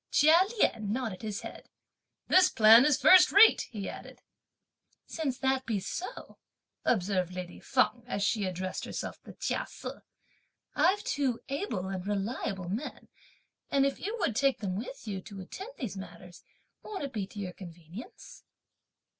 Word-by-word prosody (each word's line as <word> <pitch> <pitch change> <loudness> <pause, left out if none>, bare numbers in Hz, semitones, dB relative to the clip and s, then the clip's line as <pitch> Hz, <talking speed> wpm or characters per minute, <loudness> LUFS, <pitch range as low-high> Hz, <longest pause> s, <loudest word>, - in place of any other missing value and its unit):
Chia 310 +3 +6 0.2
Lien 210 - +1
nodded 225 -5 -3
his 215 -3 -4
head. - - -10 0.6
"This 370 0 +6
plan 225 +3 +7
is 295 -3 +3
first 370 -1 +7
rate!" 410 +3 +7
he 205 -4 -5
added. - - -9 0.9
"Since 285 -6 -3
that 265 0 0
be 220 -4 0
so," 370 - -7 0.4
observed 185 -4 0
lady 180 -1 -7
Feng, 255 -2 +1
as 200 -5 -2
she 210 +1 +1
addressed 185 0 -4
herself - - -6
to - - -10
Chia - - -2
Se, - - -7 0.8
"I've 370 +8 +2
two 265 -5 -1
able 275 - -3
and 190 0 -5
reliable 200 -2 -3
men; 225 +10 -5 0.6
and 275 -1 +3
if 275 - -1
you 430 +4 -4
would 245 - 0
take 275 +2 +2
them 190 -4 -3
with 225 +2 -7
you, 195 -3 -4
to 200 +1 -10
attend 390 - -8
to - - -16
these 205 -5 -4
matters, 180 -2 -11 0.4
won't 400 -7 -6
it 275 - -5
be 205 -4 -3
to 205 - -15
your 185 -3 -5
convenience?" 175 +3 -11
220 Hz, 160 wpm, -30 LUFS, 190-275 Hz, 0.9 s, plan